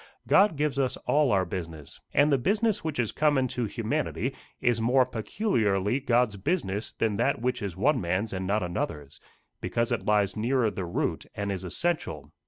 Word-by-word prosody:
God 195 -2 +5
gives 145 -2 0
us 130 -1 0
all 150 -3 +3
our 95 -2 +3
business, 80 -4 -7
and 145 +2 +4
the 140 - +3
business 210 - +1
which 160 -2 -3
is 120 -3 0
common 145 -4 +2
to 125 -1 -2
humanity 105 - -2 0.3
is 120 -2 +1
more 125 +3 +4
peculiarly 110 - 0
God's 120 -5 +2
business 105 - -2
than 110 -3 0
that - - +1
which 125 +1 -1
is 100 -5 -4
one 145 -2 +2
man's 95 +5 -1
and 95 0 -3
not 105 0 +1
another's 75 -5 -4 0.4
because 115 0 -1
it - - -2
lies 105 -2 +2
nearer 115 0 +1
the 95 - -4
root, 85 - -2
and 100 0 -2
is 95 -1 -4
essential. 90 - -2
115 Hz, 180 wpm, -27 LUFS, 95-135 Hz, 0.4 s, God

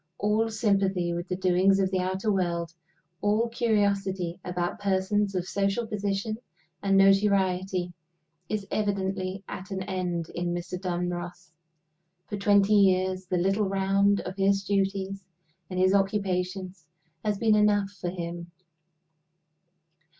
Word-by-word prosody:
All 215 +2 +1
sympathy 195 -5 +1
with 175 +1 -4
the 180 - -2
doings 185 +1 +3
of 190 -1 +1
the 190 - +1
outer 190 +3 -1
world, 170 -3 -1 0.5
all 210 +3 +2
curiosity 200 -6 0
about 180 +2 -3
persons 200 +1 0
of 180 0 -2
social 200 +4 0
position 205 0 -2 0.4
and 195 -1 +3
notoriety, 190 -2 +3 0.6
is 210 -2 -2
evidently 195 -2 -1
at 185 - -7
an 190 -1 -3
end 180 -3 -3
in 175 0 -2
Mr. 175 +1 -5
Dunross. 175 0 -4 0.7
For 205 - -5
twenty 200 0 +4
years 185 -2 +3
the 180 0 0
little 195 +3 +1
round 195 +1 +2
of 185 +2 -7
his 195 0 +2
duties 195 0 -1 0.5
and 185 - -5
his 185 +1 +4
occupations 190 -3 -1 0.4
has 210 -1 0
been 220 +1 +3
enough 205 -1 +3
for 180 -3 -5
him. 170 -1 -6
195 Hz, 130 wpm, -27 LUFS, 180-200 Hz, 0.7 s, twenty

